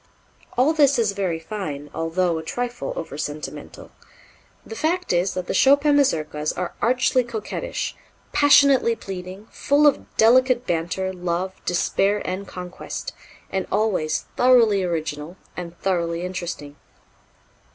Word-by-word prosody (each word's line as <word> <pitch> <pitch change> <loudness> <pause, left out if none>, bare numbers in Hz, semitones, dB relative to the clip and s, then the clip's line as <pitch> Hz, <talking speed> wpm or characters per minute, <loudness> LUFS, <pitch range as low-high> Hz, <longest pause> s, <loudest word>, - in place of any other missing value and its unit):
All 270 +6 +4
this 285 -3 +4
is 225 -4 +2
very 190 -4 -1
fine, 160 -6 -6
although 165 +1 0
a - - -7
trifle 245 +7 -4
over 150 -3 -6
sentimental. 150 -1 -6 0.7
The 450 - -8
fact 355 - 0
is 180 +2 +1
that 185 -1 -3
the - - -3
Chopin 285 +2 +5
Mazurkas 155 - +1
are 180 -1 -3
archly 250 +1 +2
coquettish, 235 - -4 0.4
passionately 280 -4 +5
pleading, 190 0 -8
full 290 +2 +2
of 290 - +3
delicate 250 +2 +4
banter, 175 +3 -2
love, 180 +1 -2
despair 195 +3 +1
and 190 +2 -4
conquest 180 -1 -7 0.4
and 190 -1 -2
always 195 -7 0
thoroughly 235 -5 +5
original 160 -1 -3 0.2
and 175 -1 -7
thoroughly 170 -2 -1
interesting. 175 -5 -5
190 Hz, 125 wpm, -23 LUFS, 170-245 Hz, 0.7 s, Chopin